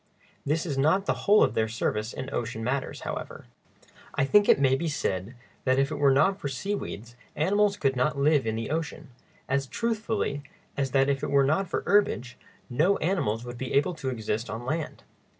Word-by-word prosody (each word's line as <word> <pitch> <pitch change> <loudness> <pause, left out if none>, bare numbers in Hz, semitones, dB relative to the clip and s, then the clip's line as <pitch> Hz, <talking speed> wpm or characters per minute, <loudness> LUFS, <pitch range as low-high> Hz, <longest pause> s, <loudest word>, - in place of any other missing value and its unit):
This 160 +4 0
is 140 -5 -2
not 160 +8 +3
the - - +2 0.2
whole 210 +1 +7
of - - +1
their 110 - +1
service 110 0 -2
in 130 +1 -6
ocean 115 -1 -3
matters, 130 +3 -2
however. - - -6 0.7
I 140 - +2
think 205 +8 +4
it - - +6
may 135 -2 +4
be 165 +5 -2
said 100 - -2 0.3
that 130 0 +2
if 135 +2 +2
it 150 - -3
were 140 -1 +5
not 190 +9 +3
for 145 - -3
seaweeds 130 - -4 0.2
animals 200 +6 +2
could 135 -7 +1
not 140 +4 +1
live 145 -3 +3
in 110 - 0
the 115 +3 -4
ocean, 155 -2 -4 0.4
as 140 +1 0
truthfully 220 - -2 0.3
as 135 -1 -1
that 135 0 +3
if 140 -1 0
it - - -2
were 140 -1 +4
not 160 +7 +1
for - - -2
herbage 130 -12 +2 0.3
no 160 +11 +2
animals 120 - -1
would 120 0 -8
be 130 - -4
able 165 +6 +2
to 140 -5 -4
exist 115 -1 -3
on 115 +3 -5
land. 155 +4 -3
140 Hz, 200 wpm, -27 LUFS, 125-165 Hz, 0.7 s, whole